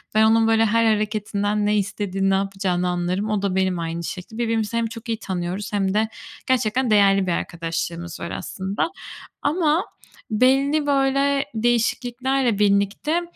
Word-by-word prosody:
Ben 215 - +5
onun, 225 +1 +4
böyle, 225 0 +4
her 230 +1 +2
hareketinden 210 -1 0
ne 210 0 +2
istediğini, 195 -1 -1
ne 195 - +3
yapacağını 190 -2 -1
anlarım. 180 +4 -1
O 210 -2 0
da 195 -2 -1
benim 190 -2 +1
aynı 165 0 -4
şekilde. 180 +6 -7
Birbirimizi 225 -1 -1
hem 230 0 +1
çok 230 +1 -9
iyi 225 -1 -1
tanıyoruz, 185 +1 -4
hem 195 -2 +1
de 220 +1 +1 0.4
gerçekten 255 0 +1
değerli 195 -2 +4
bir - - +1
arkadaşlığımız 170 0 -4
var 170 - -5
aslında. 195 - -3 0.5
Ama 315 +3 +1 0.5
belli, 270 +6 +3
böyle, 275 0 +2
değişikliklerle 240 +1 0
birlikte, 205 - +2
210 Hz, 150 wpm, -22 LUFS, 195-235 Hz, 0.5 s, Ben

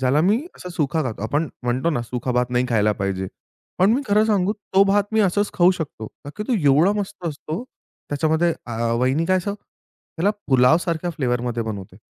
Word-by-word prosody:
ज्याला 130 +3 +3
मी 200 +7 +3 0.2
असा 180 - -8
सुका 160 -2 0
खातो. 115 -7 -4
आपण 145 +8 0
म्हणतो 125 +6 0
ना 120 -7 -1
सुका 125 +2 -3
भात 125 0 +1
नाही 125 0 +1
खायला 105 -3 +2
पाहिजे. 95 -1 -2 0.5
पण 190 +3 +5
मी 265 +4 +1
खरं 210 +1 +4
सांगू 205 -2 +2
तो 200 -2 +1
भात 200 +1 +3
मी 220 - +3
असच 205 +1 +1
खाऊ 175 +1 +5
शकतो. 150 -11 -6 0.2
का 145 - -7
की 210 - -3
तो - - +1
एवढा 150 +8 +5
मस्त 195 -3 -6
असतो. 155 +6 -4 0.5
त्याच्यामध्ये 160 +3 +2
अ, 120 - -6 0.3
वहिनी 130 +6 +1
काय 185 - +3
असं 200 +2 -2
त्याला 200 -2 -5 0.2
पुलाव 130 +2 +5
सारख्या 175 0 -2
फ्लेवर 125 -7 -1
मध्ये 120 -1 -2
बनवते. 100 -4 -6
155 Hz, 200 wpm, -22 LUFS, 125-185 Hz, 0.5 s, पण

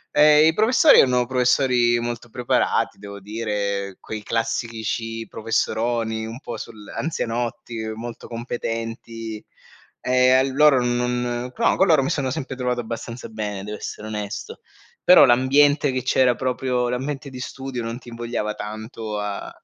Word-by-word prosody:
Ehm, 150 +1 +7
i 160 - +4
professori 250 +8 +6
erano 125 -1 +4
professori 125 -1 +3
molto 120 0 -5
preparati, 120 +1 0
devo 100 0 -9
dire, 100 -2 -3
quei 110 -1 -7
classici 115 0 -2
professoroni 115 0 -1
un 115 +3 -7
po' 120 - -6
sul 105 -2 -10
anzianotti, 120 -5 -3
molto 115 +1 -8
competenti; 115 -1 -5 0.6
ehm, 130 0 +4
a - - -6
loro 145 -3 +5
non 120 0 -1
però - - +2
con 190 - +5
loro 155 -5 +5
mi 135 - -1
sono 130 -3 -1
sempre 135 -3 -4
trovato 125 -1 -1
abbastanza 115 +1 -6
bene, 105 -3 -4
devo 105 +1 -6
essere 105 - -7
onesto; 105 -2 -6 0.4
però 180 - +8
l'ambiente 140 +3 +4
che 130 -1 -2
c'era 130 -1 +3
proprio, 125 -1 -1
l'ambiente 135 +2 -3
di 130 - -8
studio, 130 -1 -5
non 115 +1 -4
ti 125 - -13
invogliava 115 -2 -3
tanto 110 0 -6
a 105 -1 -4
120 Hz, 145 wpm, -22 LUFS, 110-130 Hz, 0.6 s, però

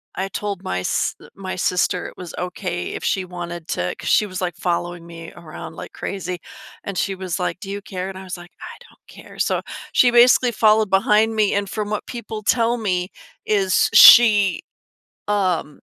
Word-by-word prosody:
I 190 +1 -2
told 200 -2 -4
my 90 - -2
s - - -1
uh, - - -15
my 190 -1 -6
sister 180 0 0
it - - -12
was 180 -2 -8
okay 180 0 -4
if - - -6
she 190 - 0
wanted 175 -2 -7
to 90 +1 -2
'cause - - -5
she 215 - +4
was 185 -1 -6
like 180 -1 -2
following 175 -1 -3
me 165 -1 -10
around 155 -2 -10
like - - -9
crazy, 185 -2 -5 0.4
and 200 -2 -5
she 195 +1 -1
was 185 -1 -4
like, 180 0 -2
"Do 195 - -8
you 200 0 -5
care?" 185 -1 -6
and 190 - -8
I 190 - -9
was 185 - -6
like, 175 +1 -13
"I - - -9
don't - - -26
care," - - -14
so, - - 0 0.3
she 245 - +5
basically 245 +1 +5
followed 215 -1 +3
behind 210 +3 +3
me, 210 -2 +2
and 200 -1 -1
from 210 0 -4
what 210 - -3
people 220 -3 -7
tell 230 +2 +2
me 185 -4 -2 0.3
is 195 -3 +2
she, 210 -6 +8 0.7
um 185 -7 -1
190 Hz, 195 wpm, -21 LUFS, 180-210 Hz, 0.7 s, she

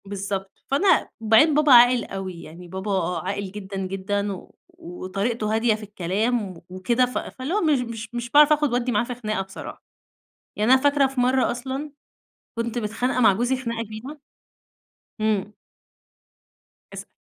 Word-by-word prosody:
بالضبط، 195 -1 -4 0.2
فأنا 370 +8 +3
وبعدين 225 +8 +5
بابا 300 0 +3
عاقل 245 0 +7
أوي، 185 -3 -6
يعني 170 +3 -11
بابا 190 0 -2
عاقل 200 -1 -4
جدًا 195 -1 -7
جدًا، 195 +1 -3 0.3
وطريقته 205 +5 -3
هادية 225 -1 +2
في 215 - -10
الكلام 210 +4 -1 0.2
و - - -17
وكده 210 +7 +1
ف 250 - -5
فاللي 260 +6 -5
هو 420 - +1
مش 305 -5 +3
مش 225 -2 -6
مش 240 0 -4
باعرف 300 +3 +7
آخد 295 -4 0
وأدّي 245 0 0
معاه 210 0 +2
في 245 +1 -5
خناقة 215 -4 -3
بصراحة. 195 +1 -9 0.7
يعني 215 +5 +3
أنا 260 - +5
فاكرة 285 -1 +3
في 265 -1 -5
مرّة 255 +1 +2
أصلًا 265 +4 -5 0.7
كنت 230 +1 -2
متخانقة 240 +3 -1
مع 220 -4 +6
جوزي 240 +6 0
خناقة 235 -3 -4
كبيرة 225 +8 -9 1.0
إمم. 210 -1 0 1.4
اسأل. - - -9
225 Hz, 155 wpm, -23 LUFS, 195-250 Hz, 1.4 s, عاقل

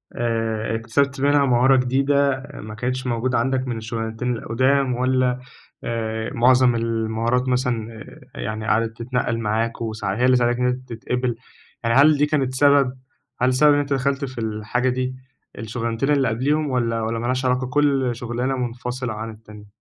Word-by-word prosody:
آآ 115 -2 -1
اكتسبت 135 +5 0
منها 145 0 +4
مهارة 130 +1 +4
جديدة، 135 +1 +1
ما 110 -5 -8
كانتش 125 +3 -3
موجودة 120 +1 0
عندك 130 +2 0
من 120 -2 -3
الشُغلانتين 115 +2 -3
القُدَام 130 +3 +1
والّا 125 0 +1 0.5
آآ، 110 -1 -3
معظم 125 +1 +4
المهارات 115 +2 0
مثلًا 125 -3 -1 0.4
آآ، - - -7
يعني 110 +1 -4
قَعدِت 115 0 +1
تتنقَّل 120 -1 -1
معاك 115 +1 -1
وساع 110 -3 -3
هي 125 - 0
اللي 130 0 +5
ساعدتك 120 0 +1
إن 125 - +2
أنت 125 0 -3
تتقبل، 125 +1 -2 0.5
يعني 115 0 +2
هل 150 +2 +6
دي 145 - +3
كانت 135 -4 0
سبب؟ 140 -1 +4 0.5
هل 125 +1 +3
سبب 150 +3 +5
إن - - +2
أنت 145 0 -3
دخَلت 140 +1 0
في 130 -2 -7
الحاجة 110 +3 -1
دي 130 0 -1 0.4
الشُغلانتين 115 +4 -2
اللي 140 -3 +3
قبليهم 145 +6 0
والّا 115 -3 0
والّا 115 +1 -2
مالهاش 125 +3 -1
علاقة، 125 0 +1
كل 135 -2 +1
شُغلانة 120 +3 -2
مُنفصلة 125 0 -4
عن 110 +1 -5
التانية؟ 105 -1 -13
125 Hz, 165 wpm, -22 LUFS, 115-130 Hz, 0.5 s, هل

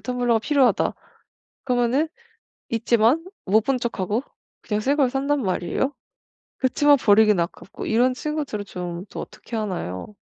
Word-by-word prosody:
텀블러가 245 -3 0
필요하다.' 275 -1 +2 0.7
그러면은 250 +4 +1 0.6
있지만 230 +6 +2 0.2
못 215 +3 +3
본 270 -1 +1
척하고 225 0 -2 0.4
그냥 210 -1 -1
새 275 +6 +1
걸 270 -4 +2
산단 280 +1 0
말이에요. 190 +8 -1 0.7
그렇지만 285 +2 +4
버리긴 210 -3 +5
아깝고 170 +3 -5
이런 245 +3 +3
친구들은 285 -8 -3
좀 180 0 -6
또 - - -6
어떻게 235 - -9
하나요? 190 - -4
235 Hz, 315 characters per minute, -23 LUFS, 210-270 Hz, 0.7 s, 버리긴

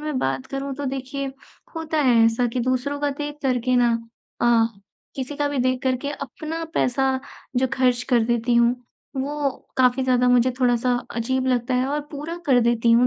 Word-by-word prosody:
मैं 300 -2 -3
बात 135 0 -1
करूँ 275 0 -4
तो 285 - -5
देखिए 270 +1 -4 0.4
होता 320 -1 -2
है 235 -4 +5
ऐसा 230 +2 +2
कि 250 - -1
दूसरों 255 +3 -1
का 290 -1 +1
देख 295 0 -4
करके 255 -1 +1
ना 240 -1 +4 0.5
अ, 235 -1 +4 0.5
किसी 270 +2 -4
का 290 -1 0
भी 285 - -2
देख 255 0 +1
करके 260 +2 0
अपना 305 +4 -5
पैसा 265 +1 +1 0.4
जो 260 - +3
खर्च 250 -2 +2
कर 245 - +5
देती 235 0 +1
हूँ, 235 +1 +4 0.4
वो 285 +1 -1 0.3
काफ़ी 255 0 +3
ज़्यादा 250 -1 +3
मुझे 250 0 +4
थोड़ा-सा 245 0 +2 0.2
अजीब 260 +3 0
लगता 250 0 +1
है 255 +1 +2
और 295 +2 -1
पूरा 305 +3 -5
कर 260 -3 +5
देती 235 0 +2
हूँ 245 +2 +5
255 Hz, 185 wpm, -23 LUFS, 245-280 Hz, 0.5 s, है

